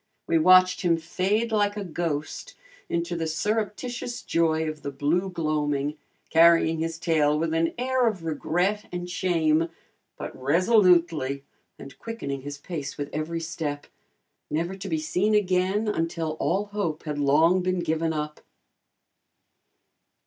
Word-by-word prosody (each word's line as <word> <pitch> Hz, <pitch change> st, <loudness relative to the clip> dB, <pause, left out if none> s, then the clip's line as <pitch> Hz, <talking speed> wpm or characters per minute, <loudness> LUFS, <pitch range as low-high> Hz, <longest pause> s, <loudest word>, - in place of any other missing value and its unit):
We 165 Hz, -, +2 dB
watched 185 Hz, +2 st, +6 dB
him 170 Hz, -2 st, +2 dB
fade 195 Hz, +7 st, -1 dB
like 205 Hz, -1 st, +1 dB
a 205 Hz, -, -3 dB
ghost 170 Hz, -, -4 dB, 0.3 s
into 170 Hz, +1 st, -1 dB
the 165 Hz, -1 st, -2 dB
surreptitious 220 Hz, +7 st, -2 dB
joy 160 Hz, -1 st, +1 dB
of 155 Hz, -1 st, -5 dB
the 140 Hz, -, -4 dB
blue 150 Hz, +7 st, 0 dB
gloaming, 150 Hz, -3 st, -1 dB, 0.3 s
carrying 165 Hz, 0 st, +5 dB
his 165 Hz, 0 st, -2 dB
tail 155 Hz, -3 st, +2 dB
with 160 Hz, +1 st, -1 dB
an 165 Hz, 0 st, +1 dB
air 255 Hz, 0 st, +1 dB
of 195 Hz, -6 st, -2 dB
regret 180 Hz, +6 st, -1 dB
and 175 Hz, 0 st, -4 dB
shame, 165 Hz, -3 st, +1 dB, 0.5 s
but -, -, -7 dB
resolutely, 170 Hz, -, +3 dB, 0.3 s
and 135 Hz, -, -11 dB
quickening 140 Hz, -, -5 dB
his 145 Hz, +1 st, -7 dB
pace 145 Hz, -1 st, -6 dB
with 145 Hz, -1 st, -5 dB
every 165 Hz, +2 st, -3 dB
step, 155 Hz, -3 st, -4 dB, 0.6 s
never 170 Hz, +5 st, -1 dB
to 195 Hz, +1 st, -7 dB
be 160 Hz, -, 0 dB
seen 180 Hz, +7 st, +1 dB
again 190 Hz, +1 st, +1 dB
until 165 Hz, -4 st, -1 dB
all 195 Hz, +4 st, 0 dB
hope 170 Hz, -7 st, -2 dB
had 150 Hz, -2 st, -4 dB
long 160 Hz, +6 st, +4 dB
been 185 Hz, 0 st, 0 dB
given 160 Hz, 0 st, 0 dB
up. 150 Hz, -1 st, -4 dB
165 Hz, 140 wpm, -26 LUFS, 155-185 Hz, 0.6 s, watched